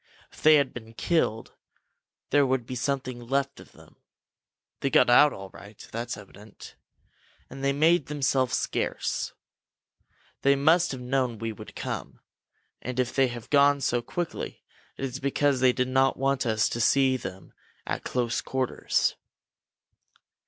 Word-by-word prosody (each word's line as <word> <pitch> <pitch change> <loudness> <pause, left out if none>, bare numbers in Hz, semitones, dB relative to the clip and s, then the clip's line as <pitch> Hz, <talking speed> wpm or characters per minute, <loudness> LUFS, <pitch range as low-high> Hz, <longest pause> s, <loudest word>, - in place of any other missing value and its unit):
If - - -15
they 155 0 +7
had 140 -3 +2
been 115 -2 -10
killed, 135 -10 0 0.8
there 145 - +5
would 130 -2 0
be 130 - -7
something 130 0 -2
left 135 +3 -2
of - - -15
them. - - -19 0.8
They 135 - 0
got 125 -2 +4
out 145 +4 +7
all 95 -1 -9
right 100 +1 -13
that's 120 +1 -4
evident. 105 +1 -13 0.8
And 135 +1 -8
they 140 - +3
made 155 +2 +3
themselves 135 -3 +1
scarce. - - -2 1.1
They 140 0 +4
must 160 +6 +3
have 130 -2 -6
known 125 -2 -1
we 115 +1 -3
would - - -12
come, - - -5 0.6
and 125 0 -4
if 125 -1 0
they 135 -1 +4
have 120 -2 -8
gone 140 0 +5
so 120 -2 0
quickly, 175 +7 -5 0.3
it 135 - -3
is 130 0 -5
because 140 0 +1
they 130 0 +5
did 125 0 -1
not 130 +1 +2
want 135 -1 0
us 110 -2 +2
to 120 - -3
see 135 +2 +4
them 95 -6 -8 0.3
at - - -3
close 120 -2 -1
quarters." 130 -2 0
130 Hz, 150 wpm, -27 LUFS, 120-140 Hz, 1.1 s, they